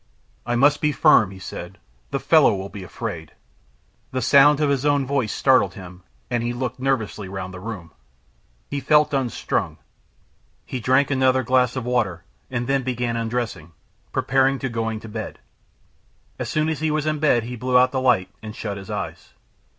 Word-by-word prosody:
"I 120 Hz, -, 0 dB
must 145 Hz, +4 st, +4 dB
be 150 Hz, -, +2 dB
firm," 110 Hz, -7 st, +5 dB
he 95 Hz, -, -11 dB
said. 95 Hz, -, -8 dB, 0.3 s
"The -, -, -2 dB
fellow -, -, +5 dB
will 95 Hz, +1 st, -5 dB
be 100 Hz, -1 st, -9 dB
afraid." 90 Hz, -, -6 dB, 0.8 s
The 130 Hz, -1 st, -2 dB
sound 140 Hz, +3 st, +6 dB
of 150 Hz, -2 st, +2 dB
his 135 Hz, -1 st, 0 dB
own 145 Hz, -2 st, +2 dB
voice 130 Hz, -5 st, 0 dB
startled 130 Hz, -2 st, +3 dB
him, 90 Hz, -2 st, -11 dB, 0.3 s
and 120 Hz, -1 st, -1 dB
he 120 Hz, +1 st, -2 dB
looked 125 Hz, 0 st, -4 dB
nervously 115 Hz, -7 st, -2 dB
round 95 Hz, -1 st, -6 dB
the 90 Hz, -, -8 dB
room. 90 Hz, -5 st, -7 dB, 0.8 s
He 145 Hz, -, -3 dB
felt 150 Hz, +2 st, +3 dB
unstrung. 130 Hz, -4 st, -1 dB, 0.9 s
He 130 Hz, -, -4 dB
drank 130 Hz, +4 st, +2 dB
another 130 Hz, -1 st, +3 dB
glass 125 Hz, 0 st, +2 dB
of 130 Hz, -2 st, -3 dB
water, 110 Hz, -9 st, -1 dB, 0.3 s
and 120 Hz, -1 st, -2 dB
then 135 Hz, +1 st, +1 dB
began 125 Hz, -2 st, -2 dB
undressing, 115 Hz, -8 st, -3 dB, 0.4 s
preparatory 135 Hz, +1 st, +2 dB
to 135 Hz, -, -2 dB
going 115 Hz, -2 st, -2 dB
to -, -, -9 dB
bed. 110 Hz, 0 st, -6 dB, 1.0 s
As -, -, -3 dB
soon 155 Hz, 0 st, 0 dB
as 160 Hz, -3 st, -2 dB
he 155 Hz, 0 st, 0 dB
was 155 Hz, 0 st, -1 dB
in 155 Hz, -1 st, -1 dB
bed 135 Hz, -6 st, +3 dB
he 125 Hz, +2 st, -6 dB
blew 125 Hz, +2 st, +1 dB
out 125 Hz, 0 st, +4 dB
the 130 Hz, -, -1 dB
light 115 Hz, -8 st, +2 dB
and 110 Hz, 0 st, -8 dB
shut 100 Hz, -3 st, -4 dB
his 95 Hz, -1 st, -10 dB
eyes. -, -, -6 dB
125 Hz, 180 wpm, -22 LUFS, 110-135 Hz, 1.0 s, sound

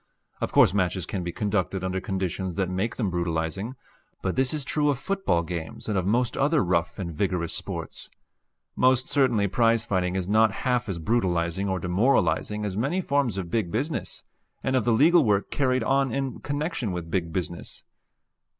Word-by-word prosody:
Of -, -, -2 dB
course -, -, +5 dB
matches 90 Hz, -3 st, 0 dB
can 95 Hz, -3 st, -4 dB
be 85 Hz, -, -3 dB
conducted 100 Hz, -2 st, -1 dB
under 95 Hz, 0 st, -2 dB
conditions 95 Hz, -1 st, -3 dB
that 95 Hz, -1 st, -1 dB
make 95 Hz, +5 st, -1 dB
them 105 Hz, -7 st, -1 dB
brutalizing. 85 Hz, +6 st, -2 dB, 0.5 s
But 95 Hz, -, -1 dB
this 130 Hz, -1 st, +3 dB
is 150 Hz, -3 st, -2 dB
true 150 Hz, +2 st, +1 dB
of 140 Hz, -, +1 dB
football 195 Hz, -, 0 dB
games 85 Hz, -2 st, -6 dB
and 105 Hz, -, -1 dB
of 95 Hz, -1 st, 0 dB
most 120 Hz, +3 st, +1 dB
other 150 Hz, 0 st, +2 dB
rough 85 Hz, -1 st, 0 dB
and 85 Hz, -4 st, -4 dB
vigorous 90 Hz, -1 st, -1 dB
sports. -, -, -5 dB, 0.7 s
Most 130 Hz, 0 st, +3 dB
certainly 125 Hz, -7 st, +2 dB
prize 115 Hz, +2 st, +2 dB
fighting 90 Hz, -1 st, 0 dB
is 95 Hz, -2 st, -2 dB
not 110 Hz, +1 st, +4 dB
half 125 Hz, -2 st, +1 dB
as 95 Hz, -, -2 dB
brutalizing 90 Hz, -1 st, 0 dB
or 95 Hz, -, 0 dB
demoralizing 95 Hz, +1 st, +1 dB
as 100 Hz, -2 st, -3 dB
many 135 Hz, -, 0 dB
forms 140 Hz, -, 0 dB
of 90 Hz, -3 st, -4 dB
big 105 Hz, -5 st, 0 dB
business 140 Hz, +8 st, -2 dB, 0.4 s
and 130 Hz, -, 0 dB
of 125 Hz, -5 st, +2 dB
the 120 Hz, -, +3 dB
legal 160 Hz, +8 st, +5 dB
work 100 Hz, -4 st, +1 dB
carried 130 Hz, -3 st, +1 dB
on 135 Hz, +2 st, +2 dB
in 135 Hz, -1 st, -2 dB
connection 145 Hz, -, -2 dB
with 85 Hz, -2 st, -5 dB
big 85 Hz, -2 st, -1 dB
business. 85 Hz, -1 st, -4 dB
100 Hz, 180 wpm, -26 LUFS, 90-130 Hz, 0.7 s, course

